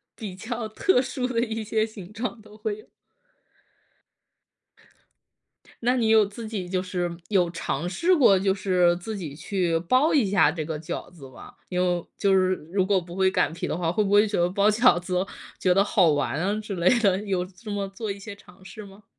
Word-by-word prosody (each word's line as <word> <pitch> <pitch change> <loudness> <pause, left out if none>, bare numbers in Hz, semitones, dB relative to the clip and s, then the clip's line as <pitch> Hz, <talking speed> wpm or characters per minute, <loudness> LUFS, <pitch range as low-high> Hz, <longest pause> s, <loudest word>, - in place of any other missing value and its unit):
比 200 -5 -7
较 225 +2 -5
特 250 - +2
殊 250 0 -2
的 240 -2 -1
一 225 -2 -3
些 220 +1 0
形 205 -4 -11
状 230 +1 -5
都 215 0 -16
会 215 -1 -4
有。 - - -16 3.0
那 250 +2 +2
你 230 -3 +1
有 220 -1 +6
自 210 +3 -8
己 200 -5 -4
就 185 0 -1
是 180 -2 -3
有 180 -4 +2
尝 165 -1 -3
试 335 - +2
过 220 - +5
就 195 0 +1
是 180 -3 +2
自 215 +5 -6
己 155 -7 -6
去 170 +1 -1
包 255 - +3
一 280 -7 +4
下 195 -6 +3
这 160 -2 -4
个 155 -2 -4
饺 165 +2 -6
子 140 -7 -13
吗？ 130 - -13 0.2
因 180 -1 -2
为 180 -1 +1
就 200 -2 +2
是 185 0 +3 0.2
如 195 - +3
果 195 -1 +2
不 175 0 -10
会 190 0 +3
擀 185 - 0
皮 180 +2 -4
的 - - -2
话， 170 -2 0
会 210 +5 +1
不 195 - -2
会 205 +1 +5
觉 205 - -1
得 175 - +2
包 200 +2 +2
饺 215 -5 +4
子 180 +1 -1 0.4
觉 180 -1 +3
得 195 - +5
好 190 -4 +3
玩 145 0 0
啊 200 +5 -1
之 210 -2 -6
类 175 0 +3
的， 195 -4 +3
有 185 -3 -1
这 195 +4 -13
么 200 -1 -2
做 205 +2 -5
一 200 - -6
些 200 +1 -9
尝 185 -1 -19
试 215 - -10
吗？ 195 +2 -16
195 Hz, 230 characters per minute, -25 LUFS, 180-215 Hz, 3.0 s, 有